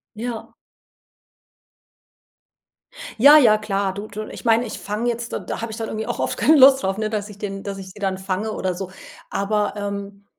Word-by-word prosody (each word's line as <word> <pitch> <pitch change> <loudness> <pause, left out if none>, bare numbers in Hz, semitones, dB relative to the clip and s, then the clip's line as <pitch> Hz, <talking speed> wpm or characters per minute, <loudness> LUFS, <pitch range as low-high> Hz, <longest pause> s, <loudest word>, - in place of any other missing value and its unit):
Ja. 230 +1 -6 2.6
Ja, 285 +6 +9
ja 220 -7 +5
klar, 200 -2 -1
du 205 +2 -6
du 210 +1 -6
ich - - -10
meine, 230 +1 +3
ich 215 - -6
fang 210 +4 -3
jetzt 235 0 -2
d - - -2
da - - -4
habe 230 0 -4
ich 220 - -7
dann 225 - -4
irgendwie 220 +1 -4
auch 240 - -3
oft - - -1
keine 310 +1 +5
Lust 270 0 +7
drauf, 190 0 -1
ne, 215 -1 -1
dass 210 -1 -3
ich 205 -2 -12
den 195 -2 -5
dass 200 -1 -5
ich 190 -1 -9
sie 185 - -14
dann 190 -1 -1
fange 190 +3 -3
oder 185 -3 -2
so. 185 +1 -6 0.4
Aber, 205 +1 0
ähm, 200 0 -5
210 Hz, 200 wpm, -22 LUFS, 200-230 Hz, 2.6 s, Ja